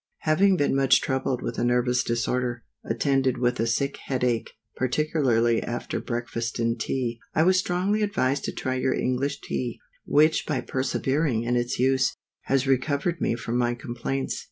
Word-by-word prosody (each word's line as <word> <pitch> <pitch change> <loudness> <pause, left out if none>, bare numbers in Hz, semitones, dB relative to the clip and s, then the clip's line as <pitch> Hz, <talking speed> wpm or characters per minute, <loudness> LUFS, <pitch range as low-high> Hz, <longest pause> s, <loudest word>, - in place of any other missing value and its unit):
_ - - -69 0.2
HAVING 185 +5 +3
been 145 -3 +1
much 135 -1 +5
troubled 130 -2 -1
with - - -3
a - - 0
nervous 125 0 +2
disorder, 120 +1 -1 0.2
attended 130 +2 +1
with 125 0 0
a 115 - +1
sick 140 +4 0
head 130 -2 -3
ache, 120 -2 0 0.3
particularly 125 -4 +1
after 120 0 -3
breakfast 120 -1 -3
and 115 0 0
tea: 120 0 -2 0.2
I 160 - +4
was 185 +2 +4
strongly 185 +4 0
advised 140 -10 0
to - - -2
try 130 - -3
your 130 0 +1
English 130 +3 -1
Tea, 120 -2 -3 0.3
which 155 +2 +3
by 145 -5 0
persevering 130 -1 0
in 120 +1 0
its 120 0 0
use, 130 +1 +2 0.3
has 135 0 +1
recovered 140 +5 0
me - - +1
from 120 0 -2
my 120 0 +1
complaints. 125 +2 -3
130 Hz, 170 wpm, -25 LUFS, 120-140 Hz, 0.3 s, much